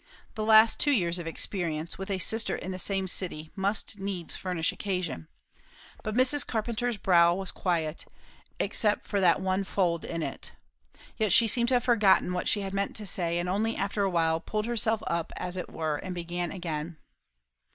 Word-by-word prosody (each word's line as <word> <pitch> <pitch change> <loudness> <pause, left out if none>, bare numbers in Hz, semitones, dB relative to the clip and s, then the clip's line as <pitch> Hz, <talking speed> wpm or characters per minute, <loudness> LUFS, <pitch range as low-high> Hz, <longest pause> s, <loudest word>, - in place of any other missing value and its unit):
The 215 - -3
last 220 +1 +6
two 290 - +3
years 175 -10 +2
of 170 - -6
experience, 165 -1 -3
with 195 - -5
a 195 - 0
sister 225 +4 +1
in 185 - -5
the 185 - -5
same 195 0 0
city, 165 -4 -1
must 200 +1 -2
needs 195 -4 -3
furnish 180 -3 -1
occasion. 180 - -3 0.7
But 215 0 -4
Mrs. 255 +3 +4
Carpenter's 235 +1 -1
brow 175 -3 +4
was 190 -1 -3
quiet, 165 -4 -2 0.5
except 210 -1 +1
for 200 -2 -1
that 180 0 +4
one 190 +1 0
fold 175 -4 0
in 165 -1 -3
it. - - -5 0.6
Yet 215 -3 +1
she 230 +5 +6
seemed 235 +2 +2
to 260 - +3
have 245 - +2
forgotten 205 -7 +4
what 180 - -2
she 205 - +2
had 195 -1 -5
meant 200 0 -1
to 215 - -7
say, 170 -3 -1
and 175 +1 -1
only 215 +5 0
after 200 +1 -1
a 195 - +2
while 165 -2 +1
pulled 215 +5 -3
herself 225 -2 0
up, 170 -1 -2
as 180 0 -2
it 180 - -5
were, 155 -2 -2
and 185 +3 -6
began 175 0 -3
again. 165 -3 -4
190 Hz, 190 wpm, -28 LUFS, 170-215 Hz, 0.7 s, last